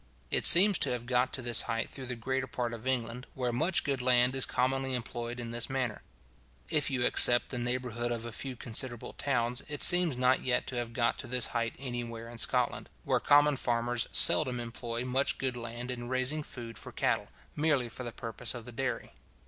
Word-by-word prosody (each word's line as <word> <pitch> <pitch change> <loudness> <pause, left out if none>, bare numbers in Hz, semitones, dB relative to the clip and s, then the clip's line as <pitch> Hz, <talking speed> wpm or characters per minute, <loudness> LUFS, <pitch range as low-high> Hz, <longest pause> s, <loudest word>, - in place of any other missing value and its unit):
It - - +1
seems 195 +2 +9
to - - 0
have 120 -1 -4
got 125 +1 0
to 130 - -2
this 120 -2 +4
height 115 0 -2
through 130 -2 -9
the 125 - -4
greater 130 +3 -3
part 120 -1 -4
of 115 +2 -8
England, 125 -1 -3
where 125 -2 -3
much 165 +8 0
good 140 -2 -2
land 125 0 +3
is 135 - +4
commonly 130 +1 -1
employed 120 0 -5
in 115 -1 -6
this 120 0 -2
manner. 130 -5 -3 0.7
If 150 -3 +1
you 130 -3 -2
except 120 0 +6
the 125 - -5
neighbourhood 120 -1 -3
of 115 -1 -4
a 120 - -6
few 130 +3 -6
considerable 120 +1 -4
towns, 125 -3 -1
it 145 -1 0
seems 175 -7 +5
not 130 +1 +2
yet 125 -1 -1
to 130 - -7
have 120 -1 -5
got 115 -1 -1
to - - -5
this 125 0 0
height 115 -1 -2
anywhere 120 -3 -6
in 120 -1 -10
Scotland, - - 0
where - - 0
common 145 0 +3
farmers 120 -1 -1
seldom 130 -5 +5
employ 120 0 -6
much 130 +2 -1
good 130 -2 -3
land 120 +1 -6
in 120 -1 -7
raising 130 +4 -1
food 120 -5 -10
for - - -10
cattle, - - -1 0.3
merely 145 -5 0
for 120 +2 -8
the 120 - -6
purpose 115 +2 -5
of 120 -2 -9
the 125 - -8
dairy. 130 +2 -5
125 Hz, 205 wpm, -29 LUFS, 120-130 Hz, 0.7 s, seems